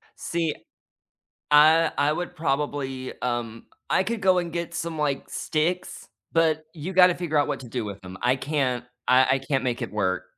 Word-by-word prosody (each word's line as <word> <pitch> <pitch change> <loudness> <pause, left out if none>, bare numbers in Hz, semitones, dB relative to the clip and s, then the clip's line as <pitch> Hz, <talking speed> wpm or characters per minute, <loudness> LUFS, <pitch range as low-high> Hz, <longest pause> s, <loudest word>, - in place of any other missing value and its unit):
See, 165 -3 -2 1.0
I 155 +2 +6
I 145 +1 +3
would 175 +1 -4
probably, 135 -3 -2
um, 120 -2 -3 0.2
I 190 - +3
could 225 +1 -3
go 185 -1 +4
and 175 -2 -1
get 170 -1 -3
some, 165 -1 -4
like, 145 -2 -1
sticks, 175 +3 -2 0.2
but 160 -1 +2
you 170 +4 -6
gotta 180 -1 +6
figure 160 -4 -1
out 145 - +3
what 145 - -2
to 125 - -10
do 120 -3 -3
with 100 -1 -7
them. 95 0 -9
I 125 +2 +3
can't 130 -3 -1 0.2
I 130 +1 +6
I 135 - +2
can't 135 -1 -1
make 125 -2 -2
it - - -4
work. 95 -3 -1
150 Hz, 185 wpm, -25 LUFS, 130-165 Hz, 1.0 s, I